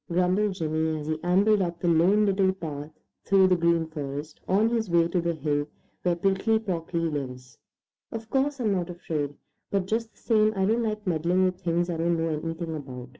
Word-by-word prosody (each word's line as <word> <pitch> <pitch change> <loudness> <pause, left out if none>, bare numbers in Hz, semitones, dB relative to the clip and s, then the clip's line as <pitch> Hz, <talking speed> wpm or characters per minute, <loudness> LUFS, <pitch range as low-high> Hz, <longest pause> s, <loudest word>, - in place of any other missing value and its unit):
grumbled 185 +3 +1
Jimmy, 160 -2 -1
as 150 - -6
he 155 0 -3
ambled 195 +4 +3
up 170 -2 -2
the 175 - -1
Lone 180 +6 +4
Little 195 -1 +3
Path 150 -5 -6 0.3
through 190 -1 +4
the 185 - +5
Green 170 -1 +2
Forest 150 -1 -6
on 210 +4 +3
his 225 -3 -1
way 170 -1 +4
to 175 +1 0
the 170 0 -1
hill 145 -1 -1 0.3
where 175 -1 +1
Prickly 195 +5 +2
Porky 180 -6 -3
lives. 130 -6 -4 0.5
"Of 225 -1 -6
course 275 +1 +1
I'm 220 -4 +1
not 180 -2 -1
afraid, 155 -5 -3 0.3
but 195 -2 0
just 225 +3 -2
the - - -32
same 215 -2 +2
I 190 -1 +1
don't 225 +4 +2
like 215 -1 -2
meddling 175 +2 +2
with 185 0 -2
things 175 -1 0
I 170 -2 -2
don't 170 +1 +1
know 165 0 0
anything 165 +1 -3
about. 130 -4 -8
175 Hz, 200 wpm, -26 LUFS, 160-195 Hz, 0.5 s, the